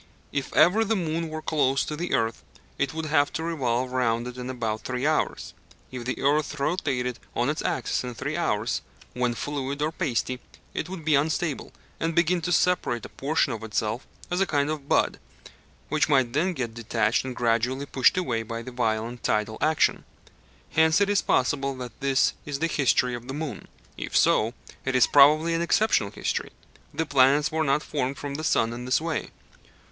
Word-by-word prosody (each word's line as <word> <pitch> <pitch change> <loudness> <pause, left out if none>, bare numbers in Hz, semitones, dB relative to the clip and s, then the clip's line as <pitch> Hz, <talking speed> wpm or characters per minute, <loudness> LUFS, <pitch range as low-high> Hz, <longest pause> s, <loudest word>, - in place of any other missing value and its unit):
If 140 -2 -3
ever 210 +6 +5
the 225 +1 0
moon 165 -3 -2
were 155 0 -6
close 135 -3 +1
to 150 - -4
the 175 +3 -1
earth, 115 0 -1 0.4
it 140 -1 +1
would 160 0 -4
have 145 -2 +2
to 160 - -3
revolve 130 -6 -1
round 120 -2 +1
it 125 0 -6
in 125 0 -6
about 110 -4 -2
three 125 +3 -3
hours. 155 0 0 0.4
If 125 -2 -6
the 130 - -2
earth 150 +1 +1
rotated 135 -6 -1 0.2
on 120 +3 +1
its 155 - -4
axis - - -1
in 125 -1 -6
three - - -3
hours, - - 0 0.3
when 125 -1 0
fluid 140 +1 -3
or 150 +1 0
pasty, 130 -6 -1 0.3
it 160 - -3
would 180 -4 -7
be 155 - +3
unstable, 150 +1 0 0.3
and 165 0 -1
begin 170 +1 +3
to 175 - -2
separate 170 -10 +1
a - - -9
portion 140 -1 0
of 110 -1 -6
itself 110 +2 -2 0.2
as 180 +2 +1
a 195 - +3
kind 145 -1 +1
of 145 -2 -6
bud, - - +2 0.7
which 155 +1 +1
might 130 -5 +3
then 175 +6 +1
get 120 -7 -3
detached 115 -1 0
and 130 -1 -5
gradually 125 +3 0
pushed 135 +4 +3
away 125 -11 0
by 115 +1 -5
the 130 - -8
violent 115 0 -1
tidal 110 +1 0
action. 155 0 +2 0.7
Hence 160 +2 +4
it 200 0 +2
is 205 - +3
possible 135 +1 +1
that 125 -3 -8
this 135 -1 +2
is 145 -2 -4
the 160 - 0
history 130 -5 +2
of 120 0 -6
the 135 - -5
moon. 150 -7 -5 0.3
If - - -2
so, 115 +3 +3 0.3
it 130 -1 -1
is 125 - +6
probably 155 +4 +6
an 165 - 0
exceptional 170 - +2
history. - - -3 0.4
The 160 - -2
planets 140 +1 +4
were 160 0 +1
not 140 +1 +1
formed 135 -2 -2
from 145 -1 -5
the 155 +3 -4
sun 115 -6 +2
in 120 +1 -6
this 125 - +2
way. 160 -1 -3
140 Hz, 195 wpm, -26 LUFS, 125-155 Hz, 0.7 s, is